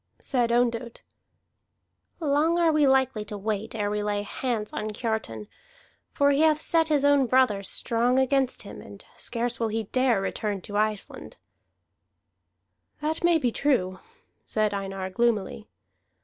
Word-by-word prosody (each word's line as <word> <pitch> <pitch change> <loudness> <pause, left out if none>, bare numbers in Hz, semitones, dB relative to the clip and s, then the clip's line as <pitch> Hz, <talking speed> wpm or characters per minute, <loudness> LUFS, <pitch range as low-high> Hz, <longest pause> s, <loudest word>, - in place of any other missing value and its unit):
Said 240 -3 0
Ondott: 235 0 0 1.2
"Long 310 +2 +2
are 335 -2 +4
we 305 -2 +3
likely 265 -5 +2
to 210 0 -7
wait 215 +2 -3
ere 205 -2 -1
we 210 0 -1
lay 205 0 -1
hands 220 -1 -3
on 215 - -3
Kiartan. 210 - -4 0.6
For 285 0 +3
he 280 - +1
hath 310 -1 +4
set 325 0 +2
his 295 -3 +2
own 285 -2 +4
brother 250 -5 +3
strong 235 +5 0
against 265 0 +1
him, - - -10
and - - -13
scarce 240 0 -2
will 230 - +1
he 220 +1 -2
dare 255 +1 +1
return 200 +1 -3
to 205 - -8
Iceland." 215 -1 -2 1.6
"That 315 +2 -2
may 340 -1 +5
be 250 -6 0
true," 185 -10 0 0.4
said 215 -1 0
Einar 195 -1 -4
gloomily. 210 - -1
235 Hz, 145 wpm, -26 LUFS, 210-275 Hz, 1.6 s, may